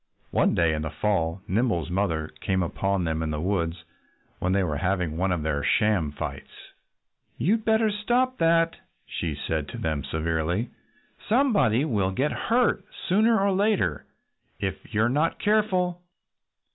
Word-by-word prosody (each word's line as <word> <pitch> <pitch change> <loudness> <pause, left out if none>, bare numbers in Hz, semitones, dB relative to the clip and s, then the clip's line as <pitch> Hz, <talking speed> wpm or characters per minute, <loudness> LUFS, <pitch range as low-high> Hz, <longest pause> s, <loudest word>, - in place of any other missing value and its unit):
One - - +2
day 85 -1 +3
in 75 - -2
the 80 - -3
fall 85 +1 -1
Nimble's 105 -6 0
mother 85 -5 -1
came 95 -1 0
upon 95 +2 -1
them 80 -1 -1
in 80 - -2
the 75 -1 -2
woods 85 -1 -1 0.6
when 90 - 0
they 100 0 +2
were 75 -5 -1
having 90 -1 -1
one 95 +3 0
of 85 -3 -1
their 75 -2 -1
sham 100 -8 +2
fights. 70 - -6 0.9
"You'd 215 - +1
better 220 -1 +3
stop 245 +5 0
that!" 165 0 +3 0.3
she 80 -4 -3
said 75 +1 -3
to - - -7
them 80 -3 -2
severely. 80 - -1 0.6
"Somebody 210 - +3
will 105 -10 +1
get 130 +10 0
hurt 240 +1 +1 0.3
sooner 220 +4 +4
or 200 0 +2
later 190 - +1 0.5
if 95 +1 -4
you're 110 +1 +2
not 150 +7 +1
careful." 185 -4 +1
100 Hz, 150 wpm, -26 LUFS, -, 0.9 s, sooner